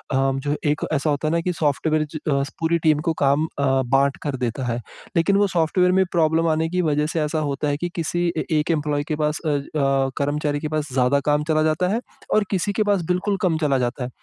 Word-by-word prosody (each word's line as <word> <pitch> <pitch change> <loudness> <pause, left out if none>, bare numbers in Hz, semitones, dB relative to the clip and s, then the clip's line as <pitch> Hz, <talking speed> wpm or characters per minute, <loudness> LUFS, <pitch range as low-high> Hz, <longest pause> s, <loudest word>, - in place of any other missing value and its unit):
जो 135 +2 0 0.2
एक 150 - -2
ऐसा 150 +1 0
होता 145 +1 0
है 155 - +1
ना 170 - +2
कि 180 +1 -1
सॉफ्टवेयर 155 0 0
ज - - 0
अ, 140 0 +2 0.2
पूरी 165 +1 +2
टीम 155 -2 +3
को - - +2
काम 140 +3 +3
अ, 135 -1 +2
बाँट 135 +2 +2
कर 145 -3 -2
देता 125 +1 -2
है। 115 - -2 0.4
लेकिन 180 +4 +3
वो 205 - +3
सॉफ्टवेयर 180 +1 +2
में 190 +1 +4
प्रॉब्लम 165 0 +2
आने 160 0 +1
की 180 +1 0
वजह 150 -2 +1
से 160 +1 -1
ऐसा 150 +1 -1
होता 145 -1 -2
है 145 0 0
कि 175 +3 -3
किसी 175 +1 -1
ए - - -1
एक 150 +3 0
एम्प्लॉयी 150 -2 0
के - - +1
पास 150 0 -1
अ 155 - +1
अ, 140 -2 0
कर्मचारी 145 +1 -1
के 155 - -3
पास 155 0 -2
ज़्यादा 130 +2 +3
काम 150 0 +2
चला 155 -1 +2
जाता 160 +3 +1
है, 230 - +1 0.3
और 215 - +4
किसी 195 +1 0
के 215 - +1
पास 205 -3 +1
बिल्कुल 195 +2 0
कम 170 -4 +2
चला 150 -4 +1
जाता 125 +1 -2
है। 125 - -4
155 Hz, 240 wpm, -22 LUFS, 140-165 Hz, 0.4 s, में